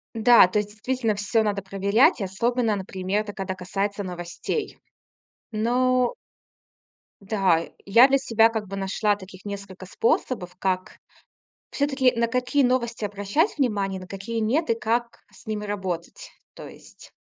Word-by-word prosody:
Да, 230 -3 +7
то 200 +3 0
есть 205 0 -3
действительно 225 0 -1
всё 220 +3 +1
надо 205 -2 -1
проверять. 200 +5 +2
Особенно, 225 +4 0
например, 190 +1 -2
это 210 -1 -7
когда 190 -1 -4
касается 195 +3 -3
новостей. 180 - -4 0.7
Но 250 - +1 1.1
Да, 195 -5 +1 0.2
я 230 +6 +7
для 275 0 +3
себя, 230 -4 +3
как 220 -2 -4
бы, 195 - -6
нашла 195 +2 0
таких 190 -1 -13
несколько 200 -2 -7
способов, 185 -1 -1
как 185 -1 -2 0.7
всё-таки, 275 -3 +2
на 235 0 +2
какие 250 +4 +1
новости 240 -3 0
обращать 205 - 0
внимание, 200 -7 0
на 185 - -10
какие 200 +5 -5
нет 240 +9 0
и - - +4
как 235 +1 -2
с - - -18
ними 210 -1 -3
работать, 205 - -5 0.2
то - - -10
есть. - - -15
210 Hz, 145 wpm, -24 LUFS, 195-240 Hz, 1.1 s, Да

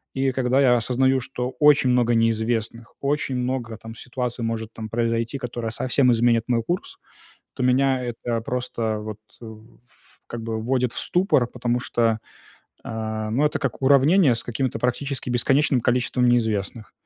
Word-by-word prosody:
И 135 0 +1
когда 130 +1 +1
я 125 -3 +5
осознаю, 130 +3 +2
что 125 0 -4
очень 145 -3 +5
много 120 -1 +3
неизвестных, 115 0 -1
очень 140 -2 -1
много 125 -3 -3
там 115 +1 -10
ситуация 125 0 -5
может 115 -1 -3
там 110 -1 -7
произойти, 115 +2 -1
которая 120 -3 -4
совсем 125 +2 +2
изменит 115 -1 +2
мой 120 -2 +1
курс, 175 +8 -4 0.6
то - - -4
меня 130 0 +2
это 120 -1 -3
просто 115 -3 -3
вот 105 0 -7 0.2
в 110 0 -12
ф - - -27
как 120 -1 -6
бы 110 -1 -3
вводит 125 0 0
в - - -4
ступор, 180 - +2
потому 120 0 -2
что, 115 -2 0 0.6
э, 110 -1 -4
ну 130 +7 +1
это 150 - -1
как 135 -1 -3
уравнение 140 +2 +5
с 115 - -4
какими-то 120 0 -2
практически 130 +1 -2
бесконечным 135 +2 +2
количеством 125 +1 +1
неизвестных. 110 -2 -1
120 Hz, 160 wpm, -23 LUFS, 115-130 Hz, 0.6 s, я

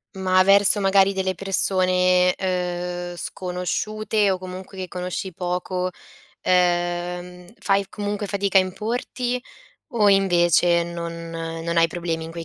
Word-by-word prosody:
Ma 185 -1 +3
verso 200 +1 +5
magari 195 0 +4
delle 190 -1 -1
persone, 185 -1 +2
uhm, 180 -1 -3
sconosciute 205 +4 -2
o 190 - +1
comunque 185 +1 -9
che 185 -1 -4
conosci 180 +1 -5
poco, 180 +1 -2 0.5
ehm, 175 0 0
fai 195 -1 +1
comunque 205 0 -4
fatica 200 -1 +2
a - - +5
importi 240 +5 -3 0.5
o 225 -7 +2
invece 175 -3 +4
non 170 -1 -6
non 165 0 -4
hai 165 0 +5
problemi 165 -1 -3
in 165 - -7
quei 165 0 -7
185 Hz, 125 wpm, -23 LUFS, 175-195 Hz, 0.5 s, verso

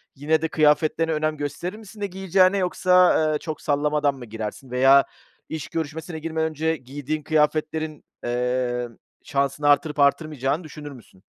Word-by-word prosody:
yine 150 +3 +1
de 160 - 0
kıyafetlerine 155 +1 +2
önem 155 0 -1
gösterir 145 +7 -4
misin, 220 -1 -13
ne 200 - 0
giyeceğine 190 0 +2
yoksa, 180 -1 +4 0.2
ııı, 155 -1 0
çok 155 -3 -6
sallamadan 145 -1 +1
mı 130 -2 -9
girersin 110 +3 -7
veya 135 +2 +6 0.5
iş 160 -2 -5
görüşmesine 160 +1 -5
girmeden 160 0 -1
önce 160 +1 -1
giydiğin 145 +3 -5
kıyafetlerin, 155 0 0 0.2
eee, 125 0 -1 0.4
şansını 140 +1 -1
arttırıp 145 +1 +3
artırmayacağını 145 +1 +1
düşünür 150 -2 -9
müsün? 115 -7 -16
150 Hz, 145 wpm, -23 LUFS, 140-160 Hz, 0.5 s, veya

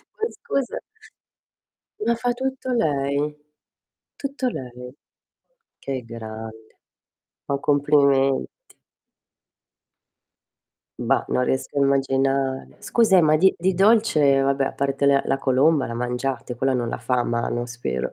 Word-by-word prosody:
Ma 450 +1 -2
scusa 275 - -3 1.3
ma 235 - +2
fa 245 +1 -1
tutto 260 +1 -4
lei? 145 - 0 0.8
Tutto 275 -2 -3
lei. 125 - -8 0.9
Che 135 -2 -4
grande. 110 -1 -9 0.7
Ma 140 - 0
complimenti. 140 -2 +1 2.3
Bah, 130 +3 +1
non 125 - +1
riesco 130 +2 -2
a - - +3
immaginare. 135 -1 0
Scusa, 225 -5 +3
e 180 - +7
ma 155 -1 +4
di 190 +3 +4
di 185 +2 +1
dolce 195 -8 +4
eh - - +3
vabbè, 135 0 +1
a - - -3
parte 140 0 -1
le 140 0 +4
la - - +1
colomba 135 +3 +2
la 115 - -5
mangiate, 125 +1 -3
quella 135 +1 +1
non 120 -2 -1
la - - -3
fa 120 +2 -3
a 120 - +1
mano 120 +1 -2
spero, 120 - -4
135 Hz, 130 wpm, -23 LUFS, 125-160 Hz, 2.3 s, e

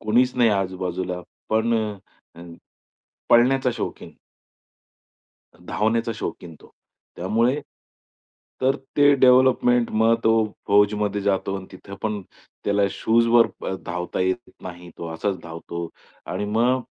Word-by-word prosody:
कुणीच 125 +4 +2
नाही 120 -2 +4
आजूबाजूला, 95 -2 -2 0.3
पण 110 +2 +2 0.6
अ, - - -11 0.9
पळण्याचा 130 +2 +4
शौकीन. 115 - -6 1.5
धावण्याचा 110 +6 -1
शौकीन 85 -5 -6
तो, - - -18 0.5
त्यामुळे 115 +10 +1 1.0
तर 135 +2 +3 0.2
ते 145 0 +6
डेव्हलपमेंट 125 -2 +4
मग 110 +1 +3
तो 110 - +5 0.4
फौजमध्ये 105 0 +2
जातो 95 -1 0
आणि 95 -1 -8
तिथं 95 +1 -10
पण 105 -1 -2 0.4
त्याला 100 0 +2
शूजवर 115 +2 +3 0.2
अ, - - -2
धावता 90 +1 -3
येत 95 +6 -1
नाही. 90 -1 -9
तो 85 - -5
असाच 95 +3 -2
धावतो 85 0 -6 0.4
आणि - - -3
मग 120 +5 +1
105 Hz, 115 wpm, -23 LUFS, 95-120 Hz, 1.5 s, ते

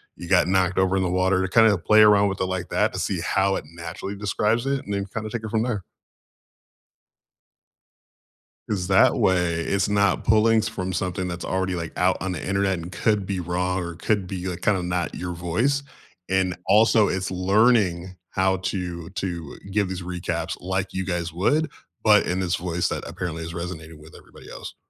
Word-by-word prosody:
you 85 - -9
got 95 -2 +4
knocked 95 -1 +1
over 95 0 +2
in 95 - +1
the 90 - 0
water" 95 +1 +2
to 95 - 0
kinda 110 +2 +5
play 110 +5 +5
around 100 -1 +5
with 95 - -5
it - - +2
like 95 -1 -3
that - - +1
to - - -4
see - - -1
how 95 0 +1
it - - -4
naturally 85 +4 -6
describes 105 +4 0
it, 140 0 -1
and 100 - -4
then 100 0 -2
kinda 110 -1 -5
take 115 -1 -4
it 110 - -4
from 110 +1 +1
there. 115 -6 -2 2.9
'Cause 90 -4 -1
that 95 -1 +5
way, 90 -2 +2
it's 100 +4 0
not 100 -1 +2
pulling 110 +1 +4
s 110 - -1
from 95 -4 -4
something 90 0 -2
that's 85 -1 -5
already, 95 0 -1
like, 85 -2 -5
out - - +2
on 95 +1 -3
the 85 - -5
Internet 95 -1 +1
and 85 +2 -8
could 105 -1 0
be 95 -1 -3
wrong 90 +1 -1
or 85 0 -5
could 105 +1 0
be, 90 0 -5
like, 90 -1 -5
kinda 95 -4 +2
not 90 0 -2
your 90 0 -4
voice, 110 +12 0 0.5
and, 95 -1 +1
also, 105 +1 +5
it's 95 0 -2
learning 95 -2 +2 0.2
how 95 0 +1
to 90 -2 -4
to 90 -6 -5
give 100 -1 +1
these 95 0 -5
recaps 90 0 -3
like 95 +1 -2
you 95 0 -2
guys 85 -2 -2
would, 145 - +1 0.3
but 105 -1 +5
in 90 +1 -1
this 90 -1 0
voice 90 0 -1
that - - -4
apparently 85 -3 -5
is 85 +1 -6
resonating 85 -2 -7
with 80 +1 -15
everybody - - -15
else. - - -8
95 Hz, 200 wpm, -24 LUFS, 90-100 Hz, 2.9 s, kinda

